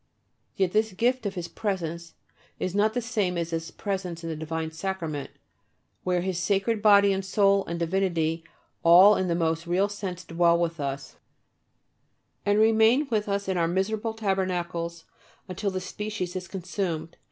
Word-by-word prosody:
Yet 190 -2 +1
this 215 0 +1
gift 240 +3 +1
of 195 - -5
His 175 -2 -4
presence 170 -5 -4 0.4
is 185 - -3
not 210 +2 +2
the 245 - -1
same 205 -6 -1
as 170 0 -2
His 165 0 -3
presence 185 -4 -4
in 165 - -3
the - - -3
divine 160 +1 -4
Sacrament, 160 -5 -4 0.7
where 180 -1 +1
His 185 -1 -2
Sacred 200 +4 0
Body 200 -1 +6
and 190 0 -2
Soul 195 0 +3
and 170 - -3
Divinity 170 -2 0 0.4
all 185 +5 +8
in 185 - 0
the 170 - +1
most 165 0 -1
real 190 +4 +2
sense 190 -3 -6
dwell 170 0 +3
with 170 -1 -1
us, 140 -1 -5 1.3
and 205 0 +3
remain 225 +6 +4
with 210 -2 0
us 200 0 -1
in 190 -1 0
our 165 -1 +2
miserable 210 +5 -1
tabernacles 175 -5 -2 0.4
until 190 +2 -2
the 190 -1 -3
species 190 -1 -5
is 185 -1 -4
consumed. 170 -3 -4
185 Hz, 165 wpm, -26 LUFS, 170-205 Hz, 1.3 s, all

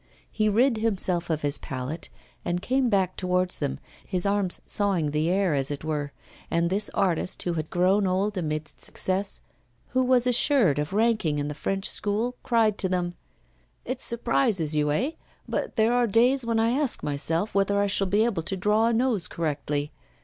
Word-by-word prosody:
He 215 -1 +1
rid 235 +3 +3
himself 190 -6 0
of 155 -2 -1
his 145 0 0
palette, 135 +3 -6 0.3
and 175 0 -1
came 255 +5 +1
back 190 -3 +1
towards 180 0 0
them, 65 - -2 0.3
his 180 0 -1
arms 200 -2 +1
sawing 190 -8 +1
the 155 +2 0
air, 190 -2 +2
as 135 -1 0
it 145 0 -5
were; 150 -2 -2 0.4
and 170 +1 +1
this 205 +2 0
artist, 180 -2 0
who 175 - -1
had 160 -1 -3
grown 190 +3 +2
old 195 +3 0
amidst 155 -4 -4
success, 190 +2 -3 0.5
who 255 - +1
was 250 -1 +3
assured 245 - +3
of 150 +3 -2
ranking 215 -7 +1
in 145 0 -2
the - - -3
French 195 +7 -2
School, 220 +4 0
cried 225 -4 +2
to 190 - 0
them: 175 -1 -1 0.7
'It 255 +1 -4
surprises 230 - 0
you, 150 -1 +1
eh? 250 - 0 0.4
but - - -3
there 225 +1 +3
are 245 -1 +3
days 245 +5 +3
when 230 -1 +1
I 225 +1 +2
ask 275 0 0
myself 160 +7 -1
whether 200 +1 +2
I 205 - +3
shall 200 -1 0
be 205 +4 +3
able 215 -8 -1
to 190 +4 -4
draw 210 +4 +2
a 235 - +2
nose 230 -6 +1
correctly. 150 -2 -2
195 Hz, 185 wpm, -26 LUFS, 160-225 Hz, 0.7 s, rid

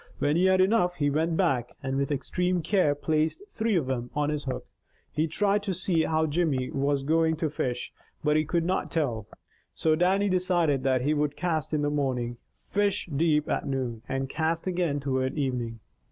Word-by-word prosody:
When 145 +1 +1
he 180 +2 +3
had 190 0 +5
enough, 185 -3 +3
he 145 -3 +1
went 160 +3 +1
back, 135 -11 +1
and 135 0 -2
with 140 +1 0
extreme 180 +5 0
care 165 -5 +2
placed 155 - 0
three 225 -1 0
of 165 -6 +2
them 125 -2 -3
on 150 0 +1
his 150 -1 -3
hook. 130 - -4 0.5
He 155 +2 0
tried 205 +5 +1
to 195 -2 -2
see 170 -2 +1
how 160 0 +1
Jimmy 145 -5 0
was 140 0 0
going 160 +2 +2
to 155 -1 -2
fish, 125 -4 -3 0.3
but 150 0 +3
he 155 - +3
could 165 +2 0
not 185 +2 0
tell. 120 -10 -1 0.5
So 160 - +2
Dannie 190 +4 +2
decided 180 -6 +2
that 130 -1 +2
he 150 +3 +2
would 150 -1 0
cast 160 -5 -1
in 150 -1 0
the 145 - +1
morning, 125 -5 -1 0.3
fish 205 -2 0
deep 150 0 +2
at - - -1
noon, 130 -4 -2
and 135 0 -1
cast 160 +3 -1
again 175 -6 0
toward 130 0 -1
evening. 120 -5 -2
155 Hz, 195 wpm, -27 LUFS, 135-175 Hz, 0.5 s, had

